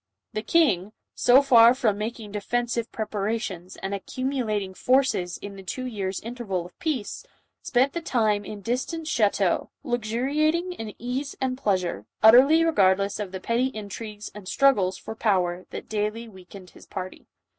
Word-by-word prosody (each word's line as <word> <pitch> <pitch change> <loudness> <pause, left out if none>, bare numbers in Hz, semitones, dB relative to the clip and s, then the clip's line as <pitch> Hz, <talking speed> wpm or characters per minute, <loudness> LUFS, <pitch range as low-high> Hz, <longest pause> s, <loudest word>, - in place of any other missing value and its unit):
The 215 - -2
king, 215 - +2 0.2
so 255 +3 +5
far 240 -3 +7
from 215 -6 +1
making 220 -1 -5
defensive 235 +3 -2
preparations 210 -4 -3
and 195 +1 -5
accumulating 215 -3 -2
forces 250 -7 +1
in 200 -1 -9
the - - -8
two 255 +7 -5
years' 195 -6 -3
interval 220 -7 -4
of 175 - -15
peace, 285 -10 -3 0.4
spent 260 +2 +2
the 340 - -3
time 215 -8 +1
in 205 0 -8
distant 255 - -2
chateaux, 205 - +1
luxuriating 285 +8 0
in 220 -10 -7
ease 260 +4 -4
and 260 -1 -1
pleasure, 185 - -1 0.2
utterly 270 +9 +7
regardless 200 -8 +2
of 205 -3 -4
the 190 - -5
petty 235 +6 +1
in 215 -6 -7
trigues 210 0 -7
and 205 -3 -10
struggles 195 -8 +3
for - - -7
power 185 -5 0
that - - -7
daily 215 +2 -2
weakened 190 -2 -13
his - - -16
party. 185 -1 -7
220 Hz, 155 wpm, -25 LUFS, 195-255 Hz, 0.4 s, far